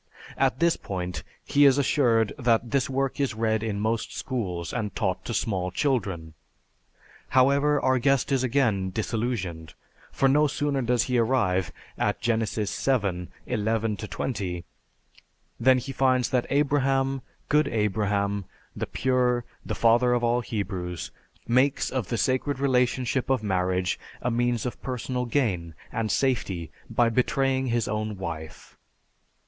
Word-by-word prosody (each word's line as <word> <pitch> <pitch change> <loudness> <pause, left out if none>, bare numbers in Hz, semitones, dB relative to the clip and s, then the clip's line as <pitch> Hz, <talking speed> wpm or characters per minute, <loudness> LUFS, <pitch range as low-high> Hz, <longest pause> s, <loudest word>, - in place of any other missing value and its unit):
At 125 - +1
this 170 0 +3
point 90 -2 -4 0.2
he 145 - +3
is 135 -1 +6
assured 120 -6 +2
that 120 -1 +2
this 140 -2 +1
work 135 +1 -1
is 135 -5 0
read 110 -1 +1
in 110 -2 -2
most 110 +1 -1
schools 90 - -3
and 105 -4 -3
taught 95 -5 -1
to 115 - -3
small 95 -4 -1
children. 95 - -1 1.0
However, 140 +3 +4
our 130 -1 +2
guest 135 +2 +2
is 135 -2 +2
again 115 -7 +1
disillusioned; 100 -6 -3 0.4
for 135 - +2
no 150 +3 +4
sooner 145 -1 -1
does 120 -1 +2
he 125 -2 +1
arrive 100 -7 +1 0.3
at - - 0
Genesis, 110 -3 -1
XII, 100 -9 0 0.2
11 110 0 0
20, 95 -6 -4 0.9
than 130 +2 +5
he 130 +2 -4
finds 130 -1 +2
that 125 -2 +1
Abraham, 135 -2 +1 0.3
good 150 0 +3
Abraham, 100 -2 0 0.3
the - - -3
pure, 125 -2 +1 0.2
the - - -4
father 120 +2 +4
of 120 -1 +1
all 120 +1 +2
Hebrews, 95 -6 -4 0.4
makes 130 +4 +2
of 125 -8 -2
the 115 - -2
sacred 130 +5 0
relationship 125 -1 +1
of 130 -4 +1
marriage 90 -2 0 0.2
a 125 - +1
means 120 0 0
of 125 - -5
personal 125 0 -3
gain 95 - -1 0.2
and 115 -1 -2
safety 100 - 0 0.2
by 120 -1 +3
betraying 130 +2 +1
his 120 -1 0
own 110 -2 -2
wife. 80 -4 -7
120 Hz, 140 wpm, -26 LUFS, 100-130 Hz, 1.0 s, is